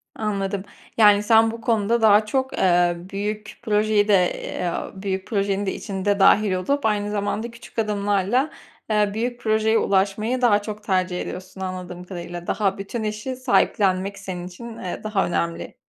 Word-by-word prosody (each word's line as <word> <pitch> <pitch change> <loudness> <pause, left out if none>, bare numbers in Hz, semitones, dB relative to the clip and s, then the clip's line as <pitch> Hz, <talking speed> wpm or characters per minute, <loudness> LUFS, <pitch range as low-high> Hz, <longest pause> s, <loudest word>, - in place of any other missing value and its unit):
Anladım. 200 -2 -2 0.3
Yani 210 -1 +6
sen 225 +1 +5
bu 230 0 -8
konuda 225 0 +1
daha 215 -1 +6
çok, 265 +4 -1
eee, 175 -1 +3
büyük 210 +1 -4
projeyi 210 -1 +2
de, 210 - +4 0.3
eee, 175 -1 -3 0.3
büyük 190 -1 -2
projenin 200 -2 0
de 190 - -1
içinde 200 0 -2
dâhil 200 0 +5
olup 225 +9 -1
aynı 210 -1 0
zamanda 210 +3 -2
küçük 235 0 -9
adımlarla, 205 +5 +1 0.4
eee, 210 -1 +2
büyük 240 +3 -2
projeye 220 0 +2
ulaşmayı 205 +6 +1
daha 210 -4 +4
çok 210 0 -7
tercih 185 -3 0
ediyorsun 185 +1 -7
anladığım 180 -1 -5
kadarıyla. 175 -1 -7
Daha 195 -3 0
bütün 200 +4 -5
işi 215 +5 -3
sahiplenmek 200 -6 +1
senin 180 -2 -6
için, 225 +5 -9
eee, 180 - -5
daha 215 -2 0
önemli. 170 -1 -2
205 Hz, 155 wpm, -23 LUFS, 190-220 Hz, 0.4 s, Yani